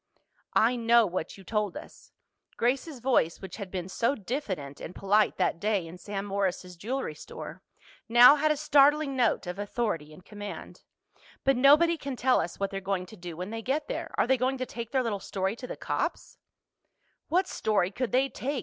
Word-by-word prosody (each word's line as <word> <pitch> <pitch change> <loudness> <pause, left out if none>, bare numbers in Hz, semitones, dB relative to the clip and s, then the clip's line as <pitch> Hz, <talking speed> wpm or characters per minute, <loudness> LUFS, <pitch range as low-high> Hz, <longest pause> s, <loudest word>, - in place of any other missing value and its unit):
"I 235 +3 +4
know 235 0 +5
what 180 -2 -4
you 195 - -13
told 210 0 -1
us." - - -13 0.5
Grace's 260 +4 0
voice, 240 -10 +2
which 190 - -8
had 200 -3 -6
been 180 -1 -4
so 230 +8 0
diffident 190 - -5
and 180 - -7
polite 205 +2 +2
that 165 - +1
day 205 -3 0
in 170 +2 -10
Sam 200 +1 -5
Morris's 190 -2 -2
jewelry 235 +1 -3
store, 150 - -9 0.5
now 240 +4 +9
had 305 +1 +1
a 305 - +2
startling 295 -1 +4
note 240 -6 +1
of 180 +2 -5
authority 205 -7 -2
and 165 +4 -15
command. 205 -1 -8 0.6
"But 270 0 +3
nobody 300 +6 +5
can 275 -3 -5
tell 255 +1 +3
us 170 +1 -6
what 195 0 -1
they're 195 0 -4
going 190 -1 -2
to 200 - -13
do 175 -4 -8
when 180 +4 -5
they 225 0 -4
get 285 +6 -1
there. - - -4
Are - - +3
they 260 +2 +3
going 260 +2 0
to 255 - -2
take 235 -2 -7
their 260 0 +1
little 215 -4 -2
story 190 +1 -2
to 250 +1 -8
the - - -6
cops?" - - -3 0.9
"What 370 +3 +2
story 200 -4 0
could 250 +3 -3
they 260 +2 +3
take?" 270 +1 -3
220 Hz, 195 wpm, -28 LUFS, 190-265 Hz, 0.9 s, now